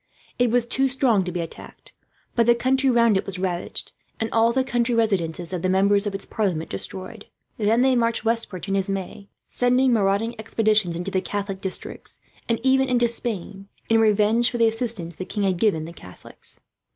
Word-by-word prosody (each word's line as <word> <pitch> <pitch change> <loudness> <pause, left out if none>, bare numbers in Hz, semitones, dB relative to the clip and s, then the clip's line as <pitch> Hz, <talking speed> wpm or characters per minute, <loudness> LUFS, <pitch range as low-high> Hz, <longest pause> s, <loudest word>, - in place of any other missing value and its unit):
It 245 -1 +3
was 240 +1 +2
too 265 +3 +1
strong 250 -6 +2
to 180 - -3
be 175 0 -2
attacked; 165 - -10 0.4
but 235 -1 +2
the 240 - +6
country 265 +3 +2
round 235 -4 +4
it - - -2
was 195 -1 -2
ravaged, 180 -2 -3 0.3
and 225 -1 -2
all 230 +1 +4
the 260 +2 +1
country 240 -2 0
residences 180 -6 0
of 180 - -2
the 185 - 0
members 200 +2 +3
of 200 - -3
its 195 - -4
parliament 180 -7 -2
destroyed. 185 - -6 0.3
Then 220 +3 +3
they 260 0 +4
marched 230 -1 +1
westward 225 -5 -1
to 195 - -4
Nismes, 195 0 -2 0.2
sending 250 +1 +2
marauding 205 +2 +1
expeditions 215 -4 +1
into 180 +3 -4
the 190 - +1
Catholic 200 -1 -4
districts, 190 - -4 0.3
and 230 - +1
even 265 0 +3
into 240 -1 +3
Spain, 200 -4 -3 0.2
in 225 0 +4
revenge 215 +2 +3
for 240 - -4
the 230 -1 +4
assistance 220 -7 -3
the - - -4
king 205 +2 -3
had 190 -2 +1
given 170 -6 +1
the 170 - -9
Catholics. 90 - -7
215 Hz, 190 wpm, -23 LUFS, 190-235 Hz, 0.4 s, the